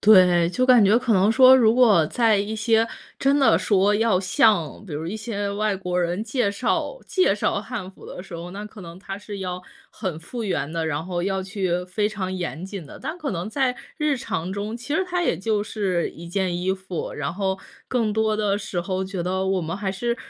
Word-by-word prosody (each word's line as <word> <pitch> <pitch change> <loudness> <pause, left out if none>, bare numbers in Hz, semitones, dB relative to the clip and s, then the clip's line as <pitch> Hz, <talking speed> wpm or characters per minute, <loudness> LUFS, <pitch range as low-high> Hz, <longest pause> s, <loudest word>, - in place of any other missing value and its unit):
对， 180 -5 +6
就 255 +8 0
感 250 -3 +6
觉 210 +4 +5
可 250 -3 0
能 195 +2 +4
说 260 +1 +8
如 225 -2 +4
果 215 -11 +5
在 225 +2 +3
一 205 +2 -2
些 225 +1 +2 0.3
真 275 +1 +3
的 275 - +5
说 200 0 +3
要 225 -4 +3
像 195 -1 +2
比 165 - -8
如 155 +3 -4
一 200 - -4
些 205 -2 -3
外 205 0 0
国 180 -1 -2
人 175 +4 -1
介 245 -4 0
绍 255 - -1
介 370 - +2
绍 200 - 0
汉 210 -5 -6
服 190 - -15
的 180 - -8
时 190 -3 -11
候， 170 +1 -7
那 205 +2 -6
可 210 0 -11
能 170 -1 -10
它 195 0 -7
是 205 -1 -8
要 180 -1 -4 0.3
很 185 -7 -4
复 230 +7 -6
原 170 -5 -2
的， 165 -1 -1
然 155 0 -2
后 175 -1 -3
要 190 0 -1
去 185 -2 -2
非 205 +3 -1
常 190 -3 -4
严 180 -2 -4
谨 190 -5 -7
的。 - - -11
但 315 +3 -4
可 300 - -3
能 175 +4 -4
在 260 -1 0 0.2
日 300 -2 +1
常 185 -8 -3
中， 205 +3 -4
其 245 +5 -4
实 380 - +1
它 360 -1 -1
也 175 - +1
就 205 +2 0
是 190 -6 -1
一 170 +1 -10
件 180 -1 -1
衣 185 +2 0
服， 190 -3 -5
然 145 +3 -4
后， 190 -1 -1 0.3
更 230 -4 0
多 220 0 +1
的 205 -2 +1
时 200 -4 -3
候 185 +1 -2
觉 190 -1 -5
得 190 +1 -1
我 190 -1 +1
们 165 +2 -4
还 200 -1 -2
是 235 +5 -2
200 Hz, 240 characters per minute, -23 LUFS, 180-220 Hz, 0.3 s, 说